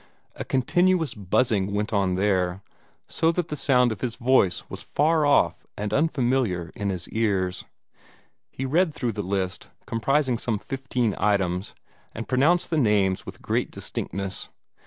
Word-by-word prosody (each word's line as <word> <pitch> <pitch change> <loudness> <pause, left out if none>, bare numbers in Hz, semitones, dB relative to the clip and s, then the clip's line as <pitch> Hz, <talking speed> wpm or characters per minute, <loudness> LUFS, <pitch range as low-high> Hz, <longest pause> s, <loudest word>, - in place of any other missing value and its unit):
A - - -5
continuous 175 +5 +2
buzzing 100 0 0
went 105 +2 -2
on 95 -3 +1
there, 95 -1 0 0.4
so 165 - +2
that 175 -1 -2
the 150 - -3
sound 125 -4 +4
of 105 - -6
his 120 -2 -2
voice 120 -7 +2
was - - -8
far 155 0 +2
off 145 - +3
and 105 0 -3
unfamiliar 125 - +1
in 100 -1 -2
his 90 -2 -4
ears. 95 -5 -1 0.8
He 135 - -5
read 160 +4 +1
through 120 -3 -1
the 105 -1 -4
list 95 -1 -3 0.2
comprising 130 +1 +1
some 115 -3 -1
fifteen 125 -2 -2
items 95 -3 0 0.4
and 115 - -5
pronounced 155 +9 +2
the 160 - +2
names 100 -6 +2
with - - -9
great - - 0
distinctness. 95 +1 -4
115 Hz, 150 wpm, -25 LUFS, 95-135 Hz, 0.8 s, sound